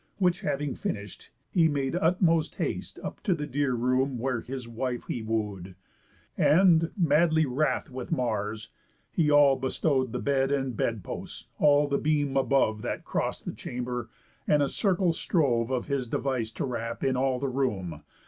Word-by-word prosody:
Which 180 Hz, -2 st, +2 dB
having 140 Hz, -1 st, -1 dB
finish'd, 100 Hz, -1 st, -5 dB, 0.2 s
he 165 Hz, -3 st, +4 dB
made 140 Hz, -1 st, -1 dB
utmost 165 Hz, -2 st, +2 dB
haste -, -, -3 dB
Up -, -, -6 dB
to 190 Hz, -6 st, +1 dB
the 150 Hz, -2 st, -4 dB
dear 140 Hz, -2 st, 0 dB
room 130 Hz, +2 st, +1 dB
where 125 Hz, 0 st, -1 dB
his 130 Hz, -2 st, -6 dB
wife 120 Hz, +1 st, -3 dB
he 120 Hz, -, -3 dB
woo'd, 105 Hz, -5 st, -3 dB, 0.6 s
And, 165 Hz, -1 st, +5 dB
madly 160 Hz, -1 st, +3 dB
wrath 140 Hz, +1 st, -1 dB
with 130 Hz, +3 st, -6 dB
Mars, 110 Hz, -6 st, -2 dB, 0.4 s
he 155 Hz, -3 st, +2 dB
all 145 Hz, -2 st, +6 dB
bestrow'd 130 Hz, -1 st, 0 dB
The -, -, -2 dB
bed, 135 Hz, -1 st, +1 dB
and 135 Hz, -3 st, -1 dB
bed 110 Hz, -2 st, -1 dB
posts, -, -, -7 dB
all 145 Hz, 0 st, +5 dB
the 140 Hz, 0 st, 0 dB
beam 145 Hz, -2 st, +1 dB
above 130 Hz, -5 st, +2 dB
That -, -, -4 dB
cross'd -, -, -2 dB
the -, -, -4 dB
chamber; 125 Hz, -1 st, -5 dB, 0.4 s
and 150 Hz, -1 st, +4 dB
a 140 Hz, -, 0 dB
circle 185 Hz, -3 st, +1 dB
strove 130 Hz, -9 st, +1 dB
Of 130 Hz, -2 st, -1 dB
his 140 Hz, -3 st, -2 dB
device 120 Hz, -2 st, -1 dB
to -, -, -2 dB
wrap 115 Hz, -2 st, -4 dB
in 130 Hz, -1 st, +2 dB
all 130 Hz, 0 st, +1 dB
the 135 Hz, +2 st, -2 dB
room. 100 Hz, -, -2 dB
135 Hz, 165 wpm, -28 LUFS, 120-150 Hz, 0.6 s, all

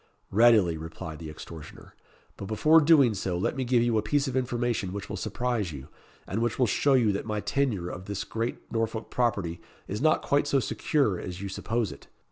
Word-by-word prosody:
"Readily," 105 Hz, -6 st, +5 dB
replied 80 Hz, 0 st, -7 dB
the 80 Hz, -2 st, -7 dB
extortioner. 75 Hz, 0 st, -11 dB, 0.4 s
"But -, -, -7 dB
before 155 Hz, +10 st, +5 dB
doing 145 Hz, -6 st, +5 dB
so 95 Hz, -2 st, -2 dB
let 90 Hz, -, -1 dB
me 135 Hz, -, -1 dB
give 120 Hz, -1 st, +3 dB
you 115 Hz, -2 st, +2 dB
a -, -, 0 dB
piece 140 Hz, +6 st, 0 dB
of 130 Hz, -, -3 dB
information 120 Hz, -6 st, -1 dB
which 100 Hz, -1 st, -5 dB
will -, -, -3 dB
surprise 120 Hz, -7 st, -2 dB
you, 70 Hz, -1 st, -9 dB, 0.4 s
and 105 Hz, +4 st, -2 dB
which 120 Hz, -1 st, 0 dB
will 125 Hz, -, +4 dB
show 135 Hz, +5 st, +2 dB
you 115 Hz, -5 st, +4 dB
that 100 Hz, +2 st, -3 dB
my 105 Hz, -1 st, -1 dB
tenure 110 Hz, -7 st, -1 dB
of 90 Hz, +1 st, -7 dB
this 100 Hz, 0 st, -3 dB
great 115 Hz, +1 st, -4 dB
Norfolk 115 Hz, 0 st, -2 dB
property 100 Hz, -9 st, -1 dB, 0.3 s
is 105 Hz, +4 st, -4 dB
not 155 Hz, +1 st, +3 dB
quite 145 Hz, +1 st, +2 dB
so 140 Hz, -1 st, +3 dB
secure 130 Hz, -, 0 dB
as 90 Hz, 0 st, -6 dB
you 100 Hz, 0 st, -5 dB
suppose 110 Hz, +1 st, -2 dB
it. 70 Hz, -, -12 dB
110 Hz, 205 wpm, -27 LUFS, 95-125 Hz, 0.4 s, Readily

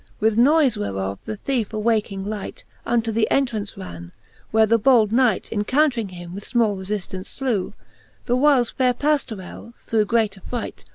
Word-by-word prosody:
With 220 Hz, 0 st, +2 dB
noyfe 275 Hz, +2 st, +4 dB
whereof 100 Hz, -1 st, -3 dB
the 215 Hz, -, -5 dB
theefe 235 Hz, -3 st, -2 dB
awaking 215 Hz, -3 st, 0 dB
light, 210 Hz, -1 st, -6 dB, 0.2 s
Unto 230 Hz, -1 st, +1 dB
the 220 Hz, 0 st, +1 dB
entrance 225 Hz, -7 st, -1 dB
ran 85 Hz, -2 st, -8 dB
j 85 Hz, -, -15 dB, 0.4 s
where 220 Hz, 0 st, +4 dB
the 230 Hz, +1 st, +3 dB
bold 225 Hz, -3 st, +4 dB
Knight 235 Hz, -4 st, +2 dB
Encountring 235 Hz, +1 st, +1 dB
him 175 Hz, -1 st, -9 dB
with 200 Hz, +2 st, -7 dB
fmall 230 Hz, -4 st, +2 dB
refiftance 190 Hz, 0 st, -5 dB
flew: 240 Hz, -9 st, -1 dB, 0.5 s
The 245 Hz, -, +1 dB
whiles 260 Hz, -3 st, +3 dB
faire 250 Hz, -2 st, +1 dB
Pajiorelly 240 Hz, -6 st, -2 dB
through 220 Hz, -2 st, 0 dB
great 215 Hz, -3 st, 0 dB
affright. 240 Hz, +4 st, -6 dB
220 Hz, 160 wpm, -22 LUFS, 200-245 Hz, 0.5 s, noyfe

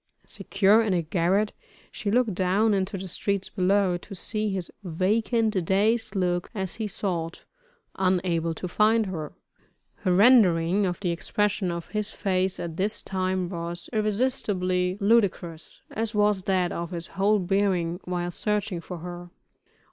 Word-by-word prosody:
Secure 205 Hz, +3 st, +3 dB
in 210 Hz, -4 st, +1 dB
a 170 Hz, -, 0 dB
garret, 185 Hz, +5 st, +1 dB, 0.4 s
she 205 Hz, -, -4 dB
looked 230 Hz, -1 st, +2 dB
down 195 Hz, +4 st, +2 dB
into 195 Hz, +1 st, -1 dB
the 190 Hz, 0 st, -6 dB
streets 195 Hz, +2 st, -2 dB
below, 190 Hz, -1 st, +2 dB
to 195 Hz, +3 st, -10 dB
see 215 Hz, +3 st, -2 dB
his 190 Hz, -3 st, -3 dB
vacant, 210 Hz, +3 st, +1 dB
dazed 215 Hz, +4 st, +1 dB
look 175 Hz, -2 st, 0 dB
as 190 Hz, -3 st, -3 dB
he 220 Hz, -2 st, -2 dB
sought, 175 Hz, -4 st, -3 dB, 0.5 s
unable 175 Hz, -3 st, +1 dB
to 180 Hz, -, -5 dB
find 215 Hz, +4 st, +3 dB
her. 160 Hz, -6 st, -5 dB, 0.7 s
Her 185 Hz, -, -1 dB
rendering 195 Hz, -4 st, +5 dB
of 175 Hz, -1 st, -3 dB
the 180 Hz, -3 st, 0 dB
expression 200 Hz, +3 st, -1 dB
of 170 Hz, -1 st, -5 dB
his 210 Hz, -1 st, -2 dB
face 190 Hz, -1 st, -1 dB
at 165 Hz, -1 st, -5 dB
this 205 Hz, +3 st, 0 dB
time, 185 Hz, -1 st, -1 dB
was 170 Hz, -1 st, -6 dB
irresistibly 200 Hz, -5 st, 0 dB
ludicrous, 195 Hz, -6 st, 0 dB
as 225 Hz, 0 st, -3 dB
was 210 Hz, -2 st, +3 dB
that 185 Hz, -2 st, +1 dB
of 170 Hz, 0 st, -4 dB
his 170 Hz, -2 st, -5 dB
whole 200 Hz, +2 st, +2 dB
bearing 185 Hz, -3 st, 0 dB
while 175 Hz, -1 st, -2 dB
searching 210 Hz, -2 st, -2 dB
for 180 Hz, +1 st, -7 dB
her. 175 Hz, +1 st, -8 dB
190 Hz, 150 wpm, -26 LUFS, 175-210 Hz, 0.7 s, rendering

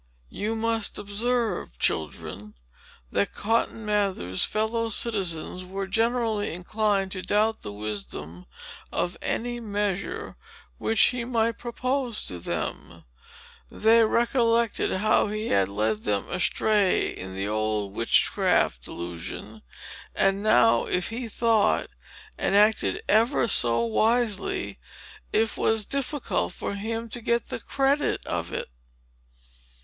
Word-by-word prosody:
You 215 Hz, +2 st, -2 dB
must 225 Hz, -1 st, 0 dB
observe, 210 Hz, -, -1 dB
children, 80 Hz, +9 st, -3 dB, 0.6 s
that 100 Hz, 0 st, 0 dB
Cotton 225 Hz, 0 st, 0 dB
Mather's 195 Hz, -, 0 dB
fellow 225 Hz, +2 st, 0 dB
citizens 185 Hz, -6 st, 0 dB
were 195 Hz, +2 st, -4 dB
generally 225 Hz, 0 st, 0 dB
inclined 195 Hz, +2 st, 0 dB
to 185 Hz, -, -4 dB
doubt 215 Hz, +3 st, +1 dB
the 105 Hz, -, -6 dB
wisdom 100 Hz, -6 st, -6 dB, 0.4 s
of 175 Hz, -, -1 dB
any 240 Hz, +1 st, -2 dB
measure, 205 Hz, -3 st, -3 dB, 0.4 s
which 225 Hz, -, 0 dB
he 245 Hz, -1 st, +4 dB
might 230 Hz, -2 st, 0 dB
propose 250 Hz, 0 st, -2 dB
to 90 Hz, -, -5 dB
them. -, -, -5 dB, 0.7 s
They 225 Hz, +2 st, +4 dB
recollected 235 Hz, 0 st, +2 dB
how 215 Hz, +3 st, +2 dB
he 215 Hz, +2 st, -3 dB
had 100 Hz, -1 st, +3 dB
led 105 Hz, +1 st, 0 dB
them 105 Hz, -2 st, -1 dB
astray 200 Hz, +2 st, +2 dB
in 95 Hz, +1 st, -8 dB
the 95 Hz, +1 st, -2 dB
old 105 Hz, -2 st, -1 dB
witchcraft 80 Hz, -, +2 dB
delusion; 85 Hz, -, -7 dB, 0.5 s
and 195 Hz, +1 st, +2 dB
now, 120 Hz, -, +4 dB
if 180 Hz, 0 st, 0 dB
he 235 Hz, +1 st, -4 dB
thought 225 Hz, -1 st, +2 dB, 0.5 s
and 195 Hz, -, +1 dB
acted 210 Hz, +1 st, +3 dB
ever 230 Hz, +5 st, +3 dB
so 115 Hz, -, +3 dB
wisely, 220 Hz, -, +1 dB, 0.5 s
it 220 Hz, 0 st, +1 dB
was 220 Hz, -1 st, +1 dB
difficult 275 Hz, +2 st, -1 dB
for -, -, -4 dB
him 225 Hz, +3 st, -3 dB
to 240 Hz, +2 st, -4 dB
get 235 Hz, +1 st, 0 dB
the -, -, -4 dB
credit 275 Hz, +2 st, 0 dB
of 85 Hz, 0 st, -3 dB
it. -, -, -4 dB
210 Hz, 120 wpm, -26 LUFS, -, 0.7 s, he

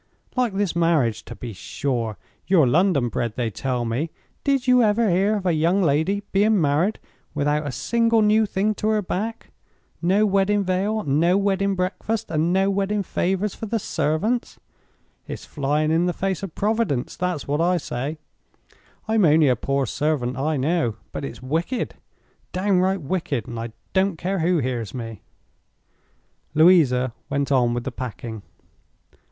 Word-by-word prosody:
"Like 250 Hz, -5 st, +1 dB
this 195 Hz, -4 st, 0 dB
marriage, 160 Hz, -10 st, +2 dB
to 120 Hz, -, -8 dB
be 115 Hz, +2 st, -7 dB
sure. 110 Hz, +4 st, -3 dB, 0.3 s
You're 180 Hz, -6 st, +5 dB
London 155 Hz, -1 st, +3 dB
bred, 115 Hz, -1 st, -2 dB
they 120 Hz, -3 st, -1 dB
tell 125 Hz, +3 st, -2 dB
me. 125 Hz, +8 st, -1 dB, 0.3 s
Did 275 Hz, -3 st, +1 dB
you 250 Hz, -1 st, +5 dB
ever 215 Hz, -1 st, +3 dB
hear 195 Hz, +5 st, +2 dB
of 200 Hz, -3 st, -4 dB
a 180 Hz, -, +3 dB
young 170 Hz, +5 st, +2 dB
lady 170 Hz, +7 st, +1 dB
being 205 Hz, +1 st, +3 dB
married 160 Hz, +7 st, +2 dB, 0.4 s
without 145 Hz, +1 st, 0 dB
a -, -, -2 dB
single 230 Hz, -, +2 dB
new 215 Hz, +1 st, +4 dB
thing 205 Hz, +2 st, 0 dB
to 210 Hz, -, -3 dB
her 215 Hz, -1 st, +2 dB
back? 220 Hz, +5 st, -4 dB, 0.5 s
No 190 Hz, +5 st, +3 dB
wedding 200 Hz, 0 st, +2 dB
veil, 195 Hz, +4 st, 0 dB
and 140 Hz, -5 st, 0 dB
no 175 Hz, +3 st, +4 dB
wedding 195 Hz, 0 st, +1 dB
breakfast, 205 Hz, +4 st, -2 dB
and 160 Hz, +2 st, +1 dB
no 195 Hz, +1 st, +2 dB
wedding 200 Hz, +1 st, 0 dB
favors 190 Hz, +3 st, -1 dB
for 220 Hz, -, -6 dB
the 225 Hz, +2 st, 0 dB
servants. 210 Hz, +5 st, -1 dB, 0.7 s
It's -, -, -7 dB
flying 150 Hz, +2 st, 0 dB
in 170 Hz, +2 st, +2 dB
the 175 Hz, -, 0 dB
face 190 Hz, -1 st, -2 dB
of 195 Hz, -5 st, -7 dB
Providence—that's 180 Hz, -, -1 dB
what 145 Hz, +3 st, 0 dB
I 180 Hz, +1 st, +3 dB
say. 145 Hz, 0 st, -4 dB, 0.9 s
I'm 220 Hz, -1 st, +3 dB
only 155 Hz, -3 st, +5 dB
a 125 Hz, -, +3 dB
poor 135 Hz, +3 st, -1 dB
servant, 135 Hz, -2 st, -1 dB
I 150 Hz, +3 st, 0 dB
know. 140 Hz, -4 st, 0 dB, 0.2 s
But -, -, -5 dB
it's 70 Hz, -, -8 dB
wicked, 165 Hz, -, -2 dB, 0.6 s
downright 190 Hz, -1 st, +1 dB
wicked—and 135 Hz, -, -3 dB
I 115 Hz, 0 st, -5 dB, 0.2 s
don't 190 Hz, -2 st, +2 dB
care 190 Hz, +3 st, -2 dB
who 175 Hz, +2 st, +2 dB
hears 120 Hz, -6 st, -2 dB
me!" 115 Hz, -4 st, -6 dB, 1.3 s
Louisa 145 Hz, -7 st, +5 dB, 0.2 s
went 140 Hz, 0 st, -1 dB
on 120 Hz, -3 st, +3 dB
with 120 Hz, -, -2 dB
the 135 Hz, -, -4 dB
packing. 115 Hz, -3 st, -6 dB
170 Hz, 160 wpm, -23 LUFS, 135-200 Hz, 1.3 s, You're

